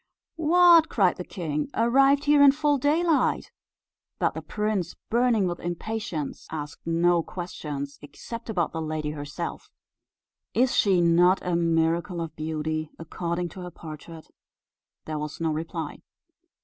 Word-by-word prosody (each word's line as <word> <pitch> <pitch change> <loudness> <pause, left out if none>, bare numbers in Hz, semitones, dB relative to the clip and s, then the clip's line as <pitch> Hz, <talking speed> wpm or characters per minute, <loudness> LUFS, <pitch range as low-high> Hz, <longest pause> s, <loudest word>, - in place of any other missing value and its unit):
"What!" 335 0 +6
cried 190 -5 +2
the 180 - -5
king; 155 - -3
"arrived 270 +5 +4
here 290 0 +4
in 280 -1 +8
full 295 -1 +1
daylight?" 315 +3 +1 0.7
But - - +1
the - - -5
prince, 210 -5 -2 0.2
burning 235 -3 +3
with 175 -1 -2
impatience, 175 -3 -4
asked 150 0 -7
no 170 +1 +3
questions, 150 -6 -6
except 230 +11 -9
about 175 -7 0
the 165 - -4
lady 155 -1 -3
herself 150 - -6 0.9
"Is 255 +2 +3
she 190 -4 +4
not 175 +2 +4
a 180 -1 0
miracle 170 +1 +1
of 165 -2 -5
beauty 155 0 -3
according 170 +1 -3
to 185 - -10
her 180 - -6
portrait?" 160 -1 -10 0.8
There 155 -1 -4
was 150 0 -6
no 165 -1 0
reply. 160 +1 -4
175 Hz, 135 wpm, -26 LUFS, 160-230 Hz, 0.9 s, in